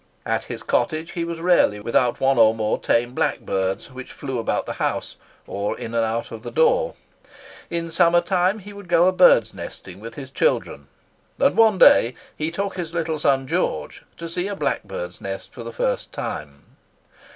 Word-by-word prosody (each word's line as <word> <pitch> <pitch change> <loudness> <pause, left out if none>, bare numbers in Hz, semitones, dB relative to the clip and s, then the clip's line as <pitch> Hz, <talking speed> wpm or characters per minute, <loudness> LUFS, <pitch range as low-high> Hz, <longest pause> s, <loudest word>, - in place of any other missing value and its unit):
At - - -1
his - - -7
cottage 160 -2 0
he 170 - -3
was 170 0 -4
rarely 170 - +3
without 120 +3 +1
one 135 -2 +3
or 110 0 +6
more 110 -1 -1
tame 120 +1 +1
blackbirds, 95 0 -1
which 130 0 -9
flew 135 -4 -4
about 115 - -1
the - - -4
house, - - -2 0.3
or 100 +1 -3
in 115 - -6
and 115 -1 +2
out 115 +1 -2
at 115 -1 -7
the 120 - -6
door. 485 - +2 0.7
In 165 -1 -3
summer 170 0 +4
time 180 +3 +1
he 205 0 -11
would 200 -2 -11
go 170 0 +4
a - - +5
birdnesting 105 - +2
with 115 +2 -9
his 135 -2 -8
children; 485 - 0 0.5
and 275 - +3
one 220 -3 +5
day 120 -8 +6 0.2
he 155 +1 -2
took 195 +3 -3
his 170 -2 -5
little 160 -2 -1
son 135 -2 +2
George - - -2
to 170 - -6
see 175 +3 -3
a 205 - -3
blackbird's - - -3
nest - - -6
for - - -9
the - - -6
first - - -2
time. - - -6
160 Hz, 185 wpm, -22 LUFS, 115-180 Hz, 0.7 s, or